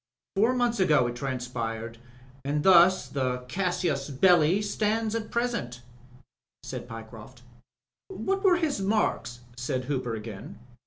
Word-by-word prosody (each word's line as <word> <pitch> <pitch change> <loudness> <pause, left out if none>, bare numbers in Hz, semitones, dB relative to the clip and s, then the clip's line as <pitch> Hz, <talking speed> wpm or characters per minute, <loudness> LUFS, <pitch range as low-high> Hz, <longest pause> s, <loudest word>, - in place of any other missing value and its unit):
Four 225 +6 +3
months 240 -2 +1
ago 150 -8 +4
it 120 0 -3
transpired, 120 -3 -4 0.4
and 145 +2 -1
thus 185 0 +6
the 125 -2 -2
casus 175 -4 -1
belli 175 +4 +4
stands 215 +1 0
at 230 -1 -3
present/' 235 - -2 0.8
said - - -6
Pyecroft. 115 +2 -11 0.6
What 390 0 -2
were 365 -3 +5
his 310 - -1
marks?" 195 - 0
said 125 +1 -3
Hooper 125 -4 -2
again. 105 -2 -8
145 Hz, 120 wpm, -27 LUFS, -, 0.8 s, thus